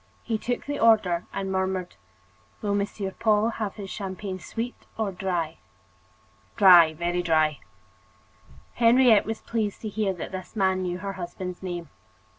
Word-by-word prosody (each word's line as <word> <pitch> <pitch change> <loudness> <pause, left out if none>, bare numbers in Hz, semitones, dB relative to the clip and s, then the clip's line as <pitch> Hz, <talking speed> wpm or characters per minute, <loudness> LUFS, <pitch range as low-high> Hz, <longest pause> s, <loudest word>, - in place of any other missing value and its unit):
He 225 -2 -2
took 245 +2 -3
the 290 0 -3
order 205 -7 +3
and 195 -1 -3
murmured: 190 -1 -1 0.7
"Will 205 -1 0
Monsieur 200 -1 -2
Paul 215 +1 +2
have 215 -4 -4
his 200 -3 -7
champagne 190 -1 -5
sweet 235 +6 -6
or 220 -3 -1
dry?" 175 -4 -3 1.0
"Dry, 175 -7 +7
very 175 +2 -1
dry." 155 -3 +2 1.1
Henriette 235 -2 +5
was 225 0 -4
pleased 215 -3 -2
to 215 - -4
hear 210 -1 0
that 175 - -7
this 185 +1 -7
man 190 -2 +2
knew 180 -1 -2
her 195 +1 -5
husband's 180 0 -6
name. 175 -4 -5
190 Hz, 145 wpm, -26 LUFS, 180-215 Hz, 1.1 s, Dry